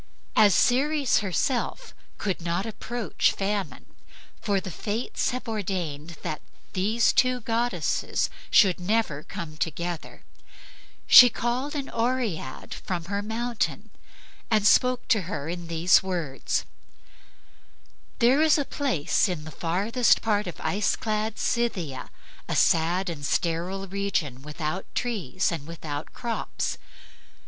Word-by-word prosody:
As 205 -4 +6
Ceres 280 +4 +3
herself 210 - -1 0.2
could 190 -4 -2
not 170 +3 -1
approach 230 +1 -1
Famine, 195 -9 -3 0.6
for 200 -2 +1
the 190 -1 -7
Fates 215 +8 -2
have 255 0 -5
ordained 175 -7 -3
that 155 -3 -4 0.3
these 215 +5 +2
two 255 -1 +2
goddesses 230 +2 0 0.2
shall 195 -5 +6
never 180 -6 0
come 155 0 -7
together, 170 +1 -4 0.8
she 245 - +10
called 245 +6 -2
an 280 -2 -3
Oread 230 - -2
from 175 -3 -4
her 200 +2 -2
mountain 230 +2 -2 0.6
and 215 -2 +2
spoke 250 +3 +4
to 215 - +4
her 155 -8 -4
in 170 0 -5
these 170 +2 +4
words: 170 -8 -2 1.5
"There 255 +4 +4
is 315 0 +5
a 290 - 0
place 250 - 0
in 170 -4 -3
the 160 - -8
farthest 200 - +2
part 210 -2 +1
of 175 - -7
ice 205 +1 +1
clad 215 0 -2
Scythia, 180 - -1 0.4
a - - -1
sad 175 +4 +3
and 160 -4 -5
sterile 175 +6 -1
region 190 -9 -2
without 155 +4 -4
trees 190 - -1
and 160 -3 -5
without 155 -3 -6
crops. 235 -2 -3
195 Hz, 120 wpm, -26 LUFS, 170-235 Hz, 1.5 s, she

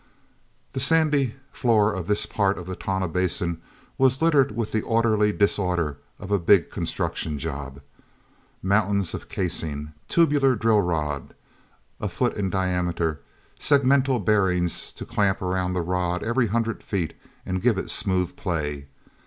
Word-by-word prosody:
he 135 - -2
sandy 145 -3 +3 0.2
floor 110 -4 +2
of 95 -3 -5
this 105 0 +3
part 100 -2 0
of 90 - -7
the 95 +1 -5
Tonah 95 0 -2
Basin 85 -1 0 0.4
was 130 0 +3
littered 150 -7 +3
with 110 -2 -2
the 110 - 0
orderly 110 -2 +2
disorder 90 -7 +1 0.2
of 95 - -9
a 100 - +3
big 90 +1 +4
construction 75 -2 -3
job—mountains 90 +8 -4
of - - -7
casing, 75 -4 -2
tubular 145 -6 +3
drill 110 -1 +3
rod, 75 -5 -3 0.6
a - - -2
foot - - -1
in 100 -2 -1
diameter; 90 -4 -1 0.4
segmental 135 -2 +3
bearings 90 -4 +1
to - - -8
clamp 100 -5 0
around 90 0 -1
the 90 -2 -1
rod 90 0 -1
every 120 +1 +1
hundred 115 +2 -1
feet 90 -6 -3 0.3
and 95 0 -2
give 115 -4 +2
it - - -2
smooth 95 -4 +1
play. 75 -5 -3
95 Hz, 140 wpm, -24 LUFS, 90-115 Hz, 0.6 s, big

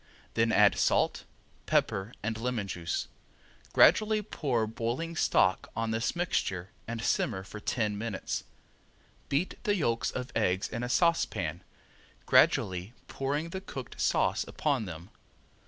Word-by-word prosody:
Then 115 0 +2
add 105 -2 +5
salt, - - +2 0.4
pepper 95 +3 +1
and 110 +1 -1
lemon 115 -2 -2
juice. 85 -2 -3 0.6
Gradually 215 0 +5
pour 130 - -1
boiling 120 +9 -3
stock - - +2
on 115 0 -1
this 115 +7 -1
mixture 95 - -1 0.2
and 115 -1 -4
simmer 100 -7 0
for 105 +2 -9
ten 105 -1 -1
minutes. 110 -3 -3 0.9
Beat 145 +7 -1
the 205 -3 +2
yolks 115 - 0
of 125 0 -5
eggs 95 -4 +1
in 115 - -4
a 120 - -3
saucepan, 110 - +1 0.6
gradually 95 +4 +3
pouring 145 +4 -2
the 190 - -4
cooked 135 -9 -7
sauce - - +2
upon 140 -7 0
them. 85 +2 -9
115 Hz, 130 wpm, -30 LUFS, 100-140 Hz, 0.9 s, add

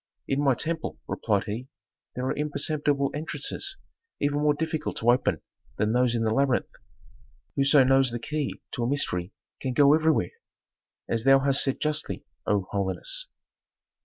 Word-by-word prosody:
"In 140 +1 0
my 135 -3 +4
temple," 165 +2 -2
replied 100 -3 0
he, 115 +4 -5 0.5
"there 125 - -3
are - - -1
imperceptible 145 -1 0
entrances 155 - -3 0.4
even 145 0 0
more 150 0 +3
difficult 155 0 -3
to 120 +2 +4
open 125 - 0 0.3
than 105 +1 +1
those 125 -1 +2
in 115 - 0
the 110 -1 +1
labyrinth. 135 0 +1 0.8
Whoso 140 0 +5
knows 135 0 +4
the 120 - -3
key 150 +4 -4
to 120 - -3
a 120 - 0
mystery 90 -10 -1 0.3
can 130 -2 -3
go 140 +2 +6
everywhere, 155 - +2 0.8
as 115 -1 -1
thou 135 +1 +7
hast 140 0 +4
said 135 - 0
justly, 150 0 -1 0.2
O 100 -2 +1
holiness." 305 - -2
135 Hz, 155 wpm, -26 LUFS, 120-150 Hz, 0.8 s, thou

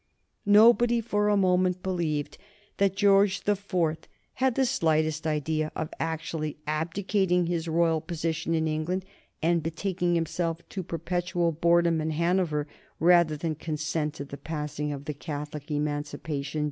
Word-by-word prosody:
Nobody 235 +3 +6
for 210 -2 0
a 205 - +3
moment 185 -1 +2
believed 165 -6 -2 0.4
that 195 -1 +2
George 200 -1 +4
the 205 - +1
Fourth 180 -5 -2 0.3
had 260 -2 +1
the 265 - +3
slightest 155 - +1
idea 155 0 -1
of 160 -1 -3
actually 160 -1 -3
abdicating 180 +3 0
his 170 -1 -2
royal 165 -1 +2
position 165 0 -2
in 160 0 +1
England 160 +5 -2 0.4
and 170 0 +3
betaking 175 +2 -1
himself 165 0 -2
to 195 - -4
perpetual 175 0 -1
boredom 170 0 +3
in 155 - -1
Hanover 165 -2 +1 0.3
rather 170 -2 +4
than 160 +1 -2
consent 155 0 -3
to 140 - -6
the 140 0 -8
passing 150 -1 -4
of 140 -1 -6
Catholic 150 -1 -6
Emancipation. 145 0 -3
165 Hz, 135 wpm, -27 LUFS, 155-180 Hz, 0.4 s, Nobody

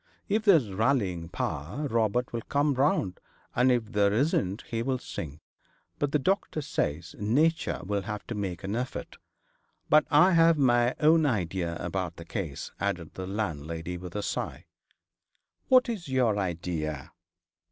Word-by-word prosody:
If 215 +2 0
there's 160 - +5
rallying 95 -7 0
power, 85 - -3
Robert 115 0 0
will 115 - -2
come 145 +4 +1
round, 130 -9 +1 0.4
and 125 +1 +4
if 115 -3 0
there 100 -1 +3
isn't 105 - +1
he'll 120 +3 0
sink. 75 - -7 0.6
But 145 -1 0
the 150 - +3
doctor 155 0 0
says 85 - -2
nature 140 - +1
will 100 +1 -1
have 105 +1 -5
to - - -5
make 95 -5 -4
an 100 +3 -2
effort. 125 +2 -5 0.7
But 155 +1 +6
I 155 +6 +6
have 165 -1 +5
my 120 -2 +3
own 155 0 +5
idea 90 - -1
about 85 0 -3
the 85 - -10
case,' 85 -6 -5
added - - -2
the 95 0 -6
landlady, 85 -4 -3
with 90 0 -9
a 105 - -2
sigh. - - -4 1.0
'What 255 0 +6
is 215 -8 -4
your 125 -5 +2
idea?' 80 -6 -3
110 Hz, 150 wpm, -28 LUFS, 90-140 Hz, 1.0 s, But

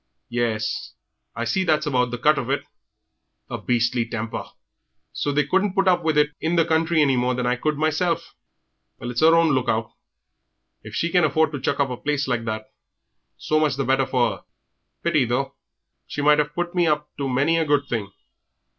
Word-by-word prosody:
Yes, 115 -3 -2 0.4
I 115 - -2
see 190 +7 +1
that's 155 -3 +1
about 125 -4 +1
the 120 - -4
cut 150 +5 +3
of 125 - -5
it. 140 +1 0 0.9
Her - - -3
beastly 120 0 +1
temper! 115 0 -5 0.7
So 145 - -1
they 145 0 +1
couldn't 190 +5 +1
put 195 -1 +2
up 180 -1 +4
with 160 -2 +1
it 150 0 +3
in 165 +2 0
the 165 -1 +4
country 160 0 +2
any 135 -2 +2
more 125 0 +1
than 125 0 -2
I 125 0 +2
could 150 +4 -1
mesel'. 155 +3 +1 0.8
Well, 120 - -5
it's 120 - -2
'er 165 +1 +6
own 165 -2 +4
look 130 -1 0
out! 110 0 -1 0.9
If 110 0 -10
she 170 +9 0
can 180 -1 +4
afford 155 +1 +2
to 145 -4 -5
chuck - - -1
up 140 -2 +1
a 125 - -4
place 145 +1 -1
like 120 -3 -1
that, 110 -1 -3 0.7
so 155 - 0
much 155 -3 +1
the 135 -1 -2
better 135 +1 +2
for 125 -2 0
'er. - - -25 0.6
Pity, 155 -5 +3
though; 135 +3 -1 0.5
she 145 - -4
might 150 0 +5
'ave 150 0 +1
put 175 0 -2
me 175 -2 +2
up 150 -1 -1
to 140 -1 -2
many 140 +6 +2
a 165 - +1
good 145 -1 +2
thing." 105 -4 -3
145 Hz, 205 wpm, -23 LUFS, 125-160 Hz, 0.9 s, er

